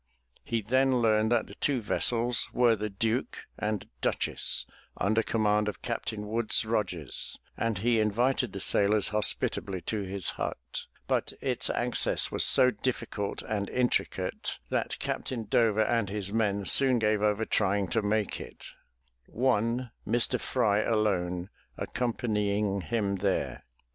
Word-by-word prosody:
He 115 -2 -2
then 130 +3 +2
learned 110 -1 +2
that 120 -2 +2
the - - -12
two 140 -3 0
vessels 120 +2 +1
were 120 -2 +4
the 105 0 -3
Duke 115 +4 -2 0.2
and 105 -2 -2
Duchess - - -1 0.3
under 110 +3 +2
command 105 -2 +1
of 105 - -5
Captain 105 -1 -4
Woodes 115 +1 +1
Rogers, 95 - -3 0.2
and 115 -3 -1
he 115 +3 +2
invited 120 +3 +1
the 95 - -6
sailors 105 +2 +4
hospitably 100 -2 +1
to 105 +5 -3
his 95 -1 -1
hut, - - -5 0.2
but - - -1
its - - 0
access - - +2
was - - +2
so 125 0 +6
difficult 115 -6 -3
and 100 -2 -3
intricate, 125 -1 -1
that - - -1
Captain 120 -3 -3
Dover 110 -1 +2
and 115 -4 0
his 100 0 -3
men 100 -3 0
soon 130 +2 +5
gave 105 -2 +1
over 105 +1 +1
trying 100 -2 +1
to 115 - +1
make 105 0 -1
it, - - -10 0.6
one, 120 0 0 0.2
Mr. 120 +1 +1
Fry, 105 -5 +1
alone 95 -5 0 0.3
accompanying 105 -5 -1
him 100 +1 -1
there. 95 0 -2
110 Hz, 140 wpm, -29 LUFS, 100-115 Hz, 0.6 s, so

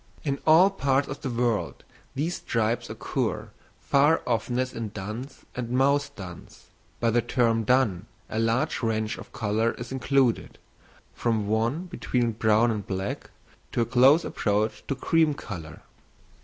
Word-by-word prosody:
In 140 -2 -1
all 170 +5 +7
parts 140 -6 +1
of 135 - -6
the 135 - -3
world 120 -2 -1 0.3
these 160 +6 -1
stripes 115 +1 -1
occur - - -3 0.3
far 145 +4 +3
oftenest 125 +2 -1
in 115 -2 -4
duns 110 +7 -7
and 125 -2 -4
mouse 140 +3 +2
duns; 95 - -11 0.3
by 115 -1 +2
the 120 +1 +3
term 115 -1 +1
dun 115 -5 +2 0.2
a 110 - -3
large 125 +6 +1
range 110 -2 -1
of - - -11
colour 110 +1 0
is 120 - -8
included, 130 -2 +1 0.6
from 110 -3 0
one 115 - 0
between 125 -9 -1
brown 110 +1 +3
and 105 -3 -4
black 95 +1 -4 0.4
to - - +1
a - - +2
close 130 +7 +5
approach 105 +1 -1
to 140 - -1
cream 155 +2 +2
colour. 80 - -8
120 Hz, 145 wpm, -26 LUFS, 110-135 Hz, 0.6 s, all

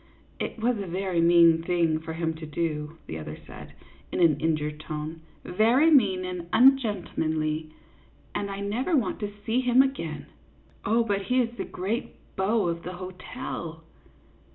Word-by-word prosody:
" - - -31
It - - -7
was 230 0 0
a 200 - -4
very 180 -1 0
mean 170 -1 +6
thing 165 -2 +1
for 160 0 -6
him 165 0 -1
to 160 - -7
do," 150 0 -3
the 80 - -6
other 75 0 -7
said, - - -11 0.4
in - - -2
an 160 -4 +4
injured 150 -1 -1
tone, 155 +1 -6 0.2
"very 235 - +4
mean 195 -10 +4
and 180 -2 -5
ungentlemanly, 170 - +2 0.6
and 200 - -2
I 195 0 -5
never 245 - 0
want 225 -8 -1
to 205 -1 -3
see 240 +2 +2
him 250 +1 +5
again." 160 - -4 0.3
" - - -28
Oh, 230 +3 +3
but 200 -3 0
he 250 +5 +2
is 235 -1 0
the - - -4
great 200 +6 -3 0.2
beau 200 0 +1
of 170 0 -2
the 180 - -6
hotel 180 -2 -7
180 Hz, 170 wpm, -27 LUFS, 160-225 Hz, 0.6 s, mean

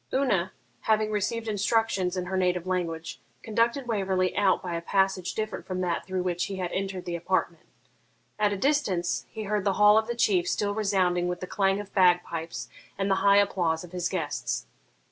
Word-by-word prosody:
Una, 205 -9 +1 0.3
having 215 -1 +1
received 225 +2 -1
instructions 205 -3 +1
in 180 - -2
her 190 +1 -3
native 180 -1 +1
language, 170 -3 -3 0.2
conducted 235 +4 +1
Waverley 190 -5 0
out 200 -2 +2
by 180 -2 -4
a 170 - -2
passage 190 0 0
different 215 0 -3
from 185 -1 -3
that 175 -1 -2
through 185 -1 -2
which 175 -1 -1
he 195 - -5
had 180 -2 -3
entered 190 -2 -3
the 175 - -3
apartment. 170 -1 -2 0.7
At 210 -1 +3
a 200 - -2
distance 200 -9 0
he 220 - -6
heard 210 -1 -1
the 200 -1 +2
hall 210 +2 +6
of 220 - -4
the 240 - -2
Chief 195 -6 +2
still 205 -1 0
resounding 185 -4 +1
with 180 0 -3
the - - -5
clang 195 +1 +1
of 205 -1 -8
bagpipes 175 -3 +1 0.3
and 195 0 0
the - - +4
high 200 0 +6
applause 175 -5 +1
of 175 - -11
his 180 -1 -2
guests. - - -3
190 Hz, 190 wpm, -27 LUFS, 180-210 Hz, 0.7 s, hall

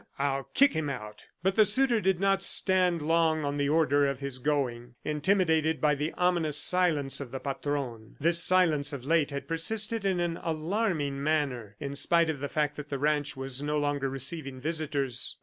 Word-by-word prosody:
I'll 135 -1 -1
kick 280 +1 +5
him 160 -2 -2
out!" 105 -6 -8 0.2
But 190 +1 +1
the 220 - +6
suitor 235 +2 +3
did 190 -3 +1
not 195 0 +2
stand 180 -4 +2
long 160 -1 +2
on 145 0 -2
the 140 0 0
order 145 -2 +3
of 140 -2 -3
his 140 -2 -3
going, 125 -4 -2
intimidated 160 0 +1
by 150 -1 +3
the 150 +2 -2
ominous 170 -4 +1
silence 155 -5 +2
of 135 - -7
the 135 - -5
Patron. 135 -5 -4
This 170 +2 +3
silence, 160 -6 +3
of 130 -3 -7
late, 160 -1 +2
had 140 -1 -6
persisted 215 +7 0
in 190 -2 0
an 170 -1 -2
alarming 160 -3 -2
manner, 140 -9 -1
in 140 0 -5
spite 170 +2 +2
of 145 - -7
the 145 +1 -4
fact 150 -1 -1
that 150 -1 -8
the 140 - -2
ranch 150 0 0
was 135 0 -4
no 150 +1 -1
longer 145 -2 -1
receiving 135 0 -5
visitors. 145 -4 -2
150 Hz, 185 wpm, -28 LUFS, 140-170 Hz, 0.2 s, the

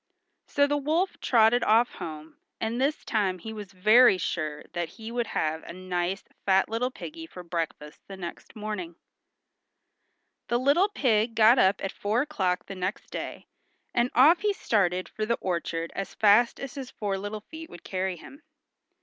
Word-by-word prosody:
So 285 - +3
the 290 0 0
wolf 320 +7 0
trotted 235 0 +4
off 230 +2 +4
home, 155 -1 -8 0.2
and 230 +3 -2
this 290 +3 0
time 195 -5 0
he 220 +5 -8
was 205 -3 -8
very 215 +3 +6
sure 155 -4 -3
that 175 -2 -2
he 220 +5 -9
would 240 -1 -1
have 160 -5 -1
a - - -9
nice 185 +1 -2 0.2
fat 190 -1 +3
little 230 +3 0
piggy 325 +5 -9
for 180 - -10
breakfast 165 -3 -5
the 195 - -9
next 175 -2 -8
morning. 210 -6 -5 1.5
The 240 - +1
little 285 +10 +3
pig 230 - +1
got 225 +3 +6
up 190 +1 +3
at 195 - -2
four 215 +5 0
o'clock 190 -12 -1
the 195 - -7
next 185 +2 -4
day, - - -6 0.5
and 240 +1 +2
off 310 +8 +7
he 415 0 +1
started 185 - 0
for 215 - -5
the 235 +2 0
orchard 170 -2 -2
as 195 - -5
fast 215 +3 +4
as 275 -2 -6
his 270 -3 -6
four 205 -2 -3
little 205 +2 -5
feet 320 +7 -10
would 175 - -12
carry 185 -1 -2
him. 275 - -13
215 Hz, 175 wpm, -27 LUFS, 185-245 Hz, 1.5 s, off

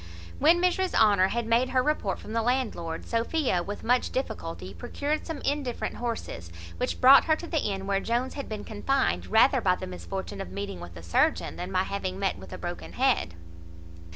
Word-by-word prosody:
When 330 +4 +5
Mrs 365 +1 +1
Honour 200 -4 +5
had 235 +3 -2
made 235 +3 +2
her 255 -1 +2
report 295 -10 0
from 215 - -9
the 230 - +1
landlord, 225 -10 -1
Sophia, 235 - 0
with 205 +4 -6
much 250 +2 +2
difficulty, 165 - -4
procured 295 - -3
some 325 -3 -5
indifferent 280 -4 -2
horses, 225 - -5 0.3
which 250 - -2
brought 265 +2 +8
her 315 - +4
to 340 - -8
the 325 -2 0
inn 195 -2 -2
where 195 0 +1
Jones 240 +5 -1
had 280 - -6
been 215 -1 -5
confined 265 +6 0
rather 245 +4 +5
by 185 -3 +3
the 185 - -6
misfortune 190 +2 -6
of - - -6
meeting 200 - -5
with 85 0 -10
a 85 - -10
surgeon 85 - +1
than 180 +2 -5
by 185 0 +2
having 190 -1 -3
met 195 -1 -1
with - - -11
a - - -6
broken 175 0 -6
head. 255 - +1
225 Hz, 195 wpm, -27 LUFS, 190-265 Hz, 0.3 s, brought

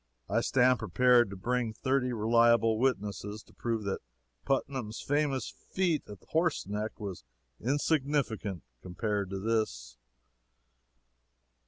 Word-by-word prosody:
I - - +1
stand 125 -2 +3
prepared 120 +3 +4
to 100 - -7
bring 120 +3 -1
thirty 130 +1 0
reliable 115 0 +4
witnesses 105 -4 -1
to - - -22
prove 115 -2 -2
that 100 -1 -2 0.5
Putnam's 130 -5 -1
famous 145 -2 0 0.2
feat 175 -5 +1
at 105 - -8
Horseneck 110 - -1
was 95 - -6 0.4
insignificant 135 - 0 0.2
compared 100 +2 -2
to 95 - -4
this. 100 - -1
115 Hz, 110 wpm, -30 LUFS, 105-130 Hz, 0.5 s, prepared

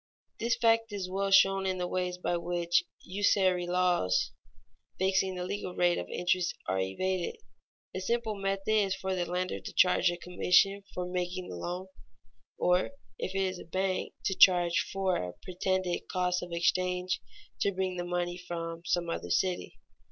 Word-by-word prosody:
_ - - -44
This 230 0 +1
fact 230 -1 +3
is 200 -3 -3
well 195 +1 0
shown 195 0 +5
in 185 0 0
the 180 0 -2
ways 180 0 -2
by 180 -1 -1
which 175 0 +1 0.2
usury 185 -2 +2
laws 180 - +2 0.7
fixing 190 0 +1
the 180 - -3
legal 185 0 -4
rate 175 -1 +3
of 90 - -6
interest 180 0 0
are 95 +1 0
evaded. 185 - -2 0.5
A 185 - -3
simple 230 +2 0
method 195 0 -2
is 200 -3 +3
for 190 0 -3
the 180 -2 -1
lender 180 +1 -1
to - - -8
charge 180 0 +4
a 175 - -3
commission 180 +3 +3
for 180 - -2
making 180 0 -3
the - - -6
loan, 175 - -4 0.7
or, 180 +7 +2 0.3
if 190 - -3
it 195 - +2
is 185 -1 -2
a - - -8
bank, 185 +2 -2
to 190 - +2
charge 175 -2 +6
for 190 -2 +1
a 90 0 -4
pretended 185 -1 -1
cost 180 0 +1
of 175 - -7
exchange 180 +2 0 0.4
to 200 - +2
bring 185 -1 -2
the 175 - -2
money 175 0 -2
from 165 -2 -5
some 175 -1 0
other 125 - -4
city. 180 - 0
180 Hz, 175 wpm, -30 LUFS, 175-190 Hz, 0.7 s, charge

